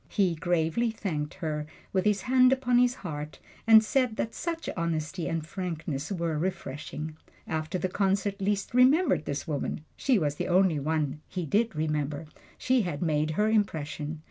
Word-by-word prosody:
He 190 -5 +2
gravely 170 +6 +1
thanked 160 -9 -3
her, 150 -2 -3 0.3
with 190 0 +1
his 205 -2 +2
hand 255 0 +5
upon 250 -2 +3
his 250 0 +3
heart, 150 -2 -5 0.3
and 220 -1 +9
said 250 0 +1
that 230 0 -2
such 330 -1 -4
honesty 170 +1 -2
and 165 -2 -2
frankness 165 -4 -4
were 170 -4 -1
refreshing. 155 -2 -4 0.3
After 160 +3 -2
the 185 - -1
concert 195 +1 0
Liszt 200 +2 -1
remembered 255 - +4
this 145 - -3
woman 145 -1 -2
she 260 -4 +2
was 150 -5 0
the - - -2
only 180 -3 +3
one 150 0 -1
he 180 -2 -4
did 220 +6 +1
remember 150 -1 -1 0.3
she 255 -1 +2
had 175 -5 -3
made 155 -2 +1
her 210 - +3
impression. 160 -7 -1
175 Hz, 165 wpm, -28 LUFS, 155-215 Hz, 0.3 s, and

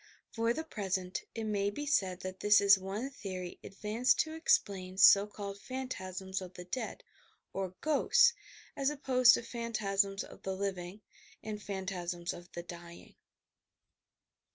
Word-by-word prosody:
For 230 0 +1
the 320 +7 -2
present 190 - -3
it 225 - -3
may 205 -2 0
be 290 +9 -5
said 190 -11 +1
that 185 0 -6
this 205 0 +6
is 200 0 +7
one 205 +8 -4
theory 185 -7 -6
advanced 215 +5 +1
to 315 - -4
explain 190 - +1
so 200 +1 +8
called 200 -1 -7
phan 260 +1 -5
tasms 190 -2 -4
of 185 0 -9
the 180 - -7
dead, 215 +8 -4 0.5
or 190 -1 -3
"ghosts," 470 +11 +4 0.4
as 275 -1 +1
opposed 255 -4 +5
to - - -4
phantasms 205 -4 -1
of - - -13
the 190 0 -3
living, 190 0 -4 0.4
and 210 -1 -5
phantasms 180 -3 -4
of 175 0 -12
the 175 - -5
dying. 170 0 -11
200 Hz, 150 wpm, -32 LUFS, 185-235 Hz, 0.5 s, so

